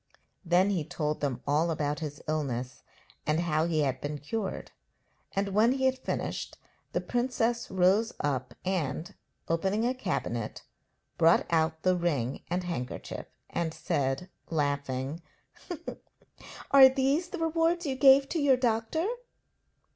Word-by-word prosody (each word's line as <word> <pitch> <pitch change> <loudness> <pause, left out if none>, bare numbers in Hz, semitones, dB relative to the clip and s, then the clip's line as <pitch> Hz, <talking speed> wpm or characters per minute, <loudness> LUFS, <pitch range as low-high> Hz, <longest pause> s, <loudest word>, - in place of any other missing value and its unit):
Then 180 +3 +3
he 180 -6 0
told 155 -2 -3
them 140 -4 -2
all 150 +4 +2
about 150 -2 -1
his 145 -2 -6
illness, 135 -5 -2 0.5
and 155 +2 +2
how 160 -2 +1
he 160 -2 +1
had 130 -3 0
been 145 +1 -3
cured, 195 +8 -4 0.6
and 200 +1 0
when 215 +5 +4
he 265 0 0
had 260 0 +2
finished - - -3 0.3
the - - -1
princess 240 -1 0
rose 190 +5 +3
up 130 -3 -2
and, 175 0 -2 0.3
opening 190 +7 +1
a 250 - +2
cabinet, 120 - -3 0.6
brought 165 +1 +5
out 160 -1 +1
the 185 0 +4
ring 145 -8 -1
and 180 +1 -1
handkerchief, 165 -8 -5 0.2
and 165 -2 -2
said, 135 +5 -1 0.2
laughing: 140 -1 -1 1.5
'Are 270 -1 +10
these 275 +6 +1
the 365 - -5
rewards 330 +1 +1
you 270 -2 -1
gave 270 0 +7
to 330 - -1
your 275 -3 +5
doctor?' 240 +6 0
175 Hz, 135 wpm, -29 LUFS, 150-240 Hz, 1.5 s, Are